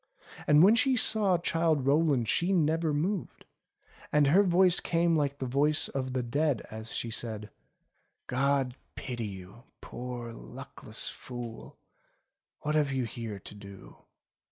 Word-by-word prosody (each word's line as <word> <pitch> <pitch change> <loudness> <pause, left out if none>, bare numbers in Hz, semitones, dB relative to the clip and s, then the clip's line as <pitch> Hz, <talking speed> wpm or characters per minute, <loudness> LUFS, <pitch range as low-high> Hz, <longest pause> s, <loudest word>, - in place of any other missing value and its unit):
And 150 +2 +6
when 200 +4 +7
she 260 +2 +3
saw 210 -5 +3
Childe 165 -4 0
Rowland 140 -4 +2
she 175 - +1
never 165 -2 +1
moved, 170 +6 -3 0.7
and 150 -1 +4
her 165 +8 +5
voice 180 -1 +4
came 170 0 +1
like 140 -2 0
the 135 - -4
voice 145 +4 +1
of 130 -1 -4
the 130 -1 -1
dead 140 +1 0
as 110 +1 -5
she 115 - -3
said: 110 -2 -2 0.7
"God 135 0 0 0.2
pity 120 -4 -5
you, 95 +5 -11
poor 120 -1 -7
luckless - - -5
fool! 120 -2 -9 0.8
What 150 - -2
have 150 -2 +2
you 130 -1 -1
here 115 -3 -6
to - - -11
do 100 -2 -13
140 Hz, 140 wpm, -29 LUFS, 120-165 Hz, 0.8 s, when